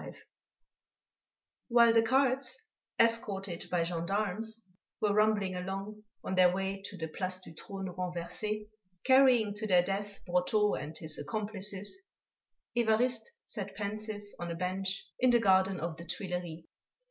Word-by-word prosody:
XXV - - -9 1.5
While 235 -1 +6
the 225 - +6
carts, 260 +2 +2 0.4
escorted 200 -6 +1
by 175 -2 +1
gendarmes, 200 +6 -1 0.4
were 210 -1 +2
rumbling 210 -3 +2
along 195 +3 -5 0.2
on - - -3
their 185 -1 +6
way 195 +1 -2
to 195 - -7
the 160 -2 -3
Place 185 +3 -2
du 185 -3 -12
Trône 190 +2 -7
Renversé, 180 +4 -3 0.4
carrying 255 -5 +5
to 210 +1 -4
their 180 -3 +5
death 200 +2 -4
Brotteaux 180 +4 +2
and 155 +2 -4
his 155 -1 -4
"accomplices," 205 - -1 0.7
Évariste 235 0 +2 0.2
sat 200 -3 -6
pensive 210 +1 -4 0.2
on 175 - -4
a 170 - -3
bench 185 +2 -2
in 255 - +4
the 240 - +6
garden 190 -2 +3
of 165 +1 -3
the 170 - -9
Tuileries. 175 -2 -4
195 Hz, 135 wpm, -31 LUFS, 180-215 Hz, 1.5 s, While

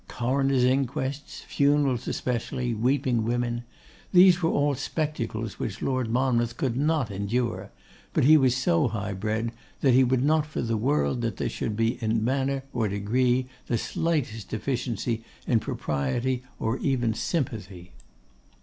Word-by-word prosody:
Coroners' 135 +1 +1
inquests, 130 +2 -1
funerals 140 -3 +1
especially, 125 0 -2
weeping 125 +1 +1
women, 120 +1 -1 0.5
these 180 -1 +7
were 165 - +2
all 145 -1 +2
spectacles 125 -6 -3
which 100 - -4
Lord 130 -3 0
Monmouth 120 -1 +1
could 125 -3 -1
not 145 -4 +1
endure, 100 -1 -2 0.4
but - - +1
he 155 +4 +7
was 130 -4 +4
so 165 +1 +2
high 105 -3 -3
bred, 110 +4 -2 0.3
that 135 -3 +4
he 130 +2 +6
would 130 0 +2
not 155 +1 +2
for 150 - -3
the 115 -1 0
world 130 +2 +1
that 115 -4 -2
there - - -1
should 105 - -3
be 115 +2 0
in 110 0 +1
manner 135 +1 0
or 115 -3 0
degree 120 +6 +1 0.2
the 120 - +1
slightest 125 - -2
deficiency 115 -1 -2 0.2
in 115 - +3
propriety 105 - -2 0.2
or 115 +3 -1
even 120 -5 +1
sympathy. 105 - -3
125 Hz, 145 wpm, -26 LUFS, 115-135 Hz, 0.5 s, these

